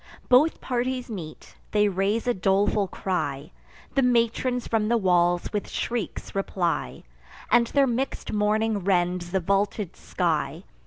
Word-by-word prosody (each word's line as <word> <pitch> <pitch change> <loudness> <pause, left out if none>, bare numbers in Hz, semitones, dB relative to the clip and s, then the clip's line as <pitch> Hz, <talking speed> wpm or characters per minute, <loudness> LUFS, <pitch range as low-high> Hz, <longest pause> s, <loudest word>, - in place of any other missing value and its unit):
Both 275 +6 +4
parties 250 0 -2
meet: 165 -7 -8
they 210 0 +3
raise 200 +4 0
a 245 - +2
doleful 195 +1 +2
cry; 155 -7 -3 0.4
The 275 - +3
matrons 245 0 +1
from 220 -2 +1
the 235 +1 +3
walls 175 -3 +2
with 210 - -2
shrieks 235 -6 -4
reply, 185 -3 -2 0.5
And 235 0 +5
their 280 +2 +3
mix'd 260 +2 -2
mourning 210 +1 +1
rends 180 -2 0
the 190 +2 +1
vaulted 200 +1 0
sky. 165 -2 -2
205 Hz, 135 wpm, -25 LUFS, 180-235 Hz, 0.5 s, And